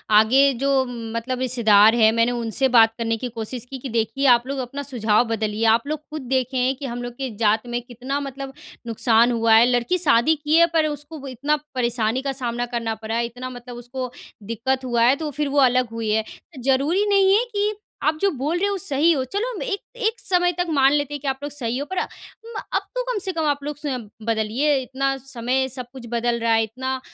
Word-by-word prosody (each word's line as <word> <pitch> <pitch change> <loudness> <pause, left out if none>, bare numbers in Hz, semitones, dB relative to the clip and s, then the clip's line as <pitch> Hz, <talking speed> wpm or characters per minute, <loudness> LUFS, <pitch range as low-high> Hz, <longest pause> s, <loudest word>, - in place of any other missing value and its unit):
आगे 260 +6 +6
जो 270 +2 +1
मतलब 235 +1 -4
रिश्तेदार 225 -4 +5
हैं, 220 -2 +5
मैंने 230 +2 +2
उनसे 240 +2 0
बात 225 -2 +6
करने 225 -1 -1
की 250 +2 -4
कोशिश 230 +2 -5
की 265 0 -6
देखिए, 230 +4 -1
आप 240 0 +5
लोग 275 0 -3
अपना 265 +3 -5
सुझाव 230 -5 +2
बदलिए 220 -1 -1
आप 235 +5 -4
लोग 305 0 -2
खुद 310 0 -5
देखें 260 0 -1
हैं 255 +2 +1
कि 275 +2 -7
हम 245 -1 -4
लोग 245 0 -6
के 270 -1 -3
जात 220 +1 +2
में 240 0 -2
कितना 250 +4 -4
मतलब 275 -1 -6 0.3
नुकसान 230 +1 +3
हुआ 230 -1 +3
है। 225 +2 +7
लड़की 245 +9 +1
शादी 300 -3 +3
की 300 +1 +2
है, 335 - +7
पर 315 -2 +3
उसको 295 -1 -7
इतना 275 +4 0 0.2
परेशानी 235 -1 0
का 275 0 -2
सामना 245 -2 -2
करना 230 -1 -1
पड़ा 220 +1 -5
है, 235 0 +1
इतना 245 +2 -7
मतलब 245 -1 -9
उसको 250 +1 -6 0.4
दिक्कत 260 +4 -1
हुआ 240 -2 +1
है, 250 +3 +5
तो 300 0 -4
फिर 295 +1 -2
वो 285 +1 +2
अलग 255 -2 +3
हुई 225 -2 -2
है। 220 +1 +2 0.4
ज़रूरी 285 +9 +2
नहीं 390 -1 +5
है 460 - +2
कि 410 +1 +1 0.3
आप 310 0 +2
जो 400 - +4
बोल 295 +5 -2
रहे 380 - +1
हो, 405 - -1
वो - - -2
सही 330 -3 +2
हो। 275 -5 +1
चलो, 405 - -2
हम - - -6
एक 410 -5 -2 0.3
एक 450 +1 0
समय 355 -1 +2
तक 355 - +1
मान 275 -3 +4
लेते 290 -1 0
हैं 290 - -4
कि 285 - -5
आप 265 0 -1
लोग 290 - -4
सही 250 -4 -3
हो, 285 - -3
पर 375 +4 -6
अम, - - 0 0.7
अब - - +2
तो - - 0
कम 450 - -1
से 375 - -1
कम 325 -2 -1
आप 285 -1 -1
लोग 295 0 -5
स्वयं 265 -7 -4 0.2
बदलिए, 230 +6 +1
इतना 270 +2 -1
समय 260 0 -1
सब 255 -1 -6
कुछ 260 -3 -9
बदल 235 0 0
रहा 230 0 +1
है। 225 0 +3
इतना 260 +4 -4
255 Hz, 230 wpm, -22 LUFS, 235-285 Hz, 0.7 s, है